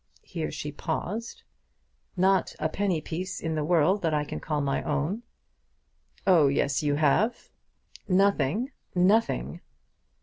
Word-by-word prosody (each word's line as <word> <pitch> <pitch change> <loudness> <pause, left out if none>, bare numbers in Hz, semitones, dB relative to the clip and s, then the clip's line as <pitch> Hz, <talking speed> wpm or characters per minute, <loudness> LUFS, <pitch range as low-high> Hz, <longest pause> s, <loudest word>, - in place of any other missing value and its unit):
Here 165 -3 -4
she 150 0 -5
paused. 185 +9 -4 0.7
"Not 190 +1 +2
a 155 - -1
penny 185 -2 0
piece 185 +5 -4
in 160 0 -3
the 155 -1 -1
world 175 +5 +3
that 160 -3 +1
I 150 - +1
can - - -6
call 150 -1 -2
my 140 -1 0
own." 155 +8 -1 1.0
"Oh 170 -7 +6
yes, 140 0 +1
you 145 -1 +1
have." 160 - +1 0.6
"Nothing. 200 - +2 0.2
Nothing!" 200 +6 +2
165 Hz, 130 wpm, -27 LUFS, 150-195 Hz, 1.0 s, Oh